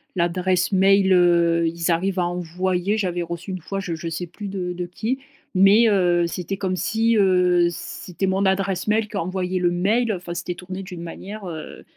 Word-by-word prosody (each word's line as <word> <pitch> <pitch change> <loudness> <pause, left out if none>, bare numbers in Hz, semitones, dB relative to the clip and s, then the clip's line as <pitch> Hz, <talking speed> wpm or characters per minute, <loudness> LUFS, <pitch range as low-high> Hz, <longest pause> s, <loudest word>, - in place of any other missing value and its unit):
l'adresse 180 +2 +1
mail, 195 0 +4
heu, 170 -2 +4
ils 165 +1 -2
arrivent 185 +3 0
à 175 - +2
envoyer 180 +3 -1
j'avais 180 -4 -1
reçu 170 +3 -6
une 185 - -4
fois, 195 +5 -4
je 175 -3 -3
je 165 +1 -6
sais 165 +2 -4
plus 200 +5 -8
de 185 -2 -3
de 180 0 -4
qui, 225 +9 -3 0.3
mais, 200 +4 +6
heu, 175 -4 +3
c'était 180 +3 -4
comme 185 -2 -2
si, 225 +3 +1
heu, 180 -3 +4
c'était 180 +2 -5
mon 190 +1 +1
adresse 190 0 0
mail 215 0 +1
qui 210 - -5
envoyait 185 0 -2
le 175 -1 +2
mail 215 +6 +1
enfin, 175 -2 -6
c'était 175 +1 -4
tourné 185 +2 -7
d'une 180 -3 -8
manière, 200 +5 -8
heu, 160 -3 -8
185 Hz, 190 wpm, -22 LUFS, 175-195 Hz, 0.3 s, mais